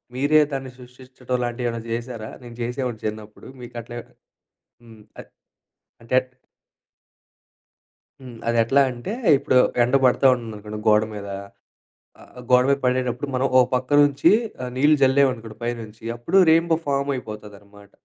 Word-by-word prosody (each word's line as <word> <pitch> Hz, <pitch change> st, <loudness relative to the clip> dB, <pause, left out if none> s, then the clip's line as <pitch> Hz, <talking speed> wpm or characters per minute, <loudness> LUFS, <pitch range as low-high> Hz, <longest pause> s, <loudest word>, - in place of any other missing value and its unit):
మీరే 145 Hz, +4 st, +3 dB
దాన్ని 135 Hz, -1 st, -5 dB
సృష్టించడం 125 Hz, 0 st, -7 dB
లాంటివి 120 Hz, 0 st, -3 dB
ఏమైనా 115 Hz, 0 st, -5 dB
జేసారా? 115 Hz, -1 st, -5 dB
నేను 120 Hz, -1 st, -11 dB
చేసేవాడిని 125 Hz, -2 st, -4 dB
చిన్నప్పుడు 110 Hz, 0 st, -7 dB
మీకట్లే 120 Hz, 0 st, -8 dB, 0.8 s
హ్మ్. 115 Hz, -2 st, -16 dB, 0.2 s
అ -, -, -5 dB, 0.8 s
అంటేంట్ 130 Hz, +2 st, 0 dB, 1.9 s
హ్మ్. 125 Hz, -3 st, -11 dB
అదెట్లా 115 Hz, +4 st, +3 dB
అంటే 120 Hz, +10 st, -7 dB, 0.3 s
ఇప్పుడు 130 Hz, -, +1 dB, 0.3 s
ఎండ 125 Hz, +3 st, +1 dB
బడతా 130 Hz, +2 st, +4 dB
ఉంటుందనుకోండి 105 Hz, -3 st, -8 dB
గోడ 105 Hz, 0 st, +5 dB
మీద. 100 Hz, -1 st, -7 dB, 0.9 s
ఆహ్, -, -, -17 dB, 0.2 s
గోడ 125 Hz, 0 st, +6 dB
మీద 140 Hz, -, +3 dB
బడేటప్పుడు 125 Hz, +1 st, -1 dB
మనం 130 Hz, +2 st, +1 dB
ఓ -, -, +8 dB, 0.2 s
పక్క 125 Hz, 0 st, -3 dB
నుంచి 145 Hz, -1 st, +3 dB, 0.3 s
ఆహ్ 125 Hz, -, -5 dB
నీళ్ళు 150 Hz, +3 st, +4 dB
జల్లామనుకోండి 130 Hz, -5 st, +1 dB
పైనుంచి 115 Hz, -2 st, -6 dB
అప్పుడు 120 Hz, +11 st, +2 dB
రైన్ 165 Hz, +1 st, +4 dB
బో -, -, +5 dB
ఫామయిపోతదన్నమాట. 105 Hz, -7 st, -5 dB
125 Hz, 125 wpm, -22 LUFS, 115-130 Hz, 1.9 s, ఓ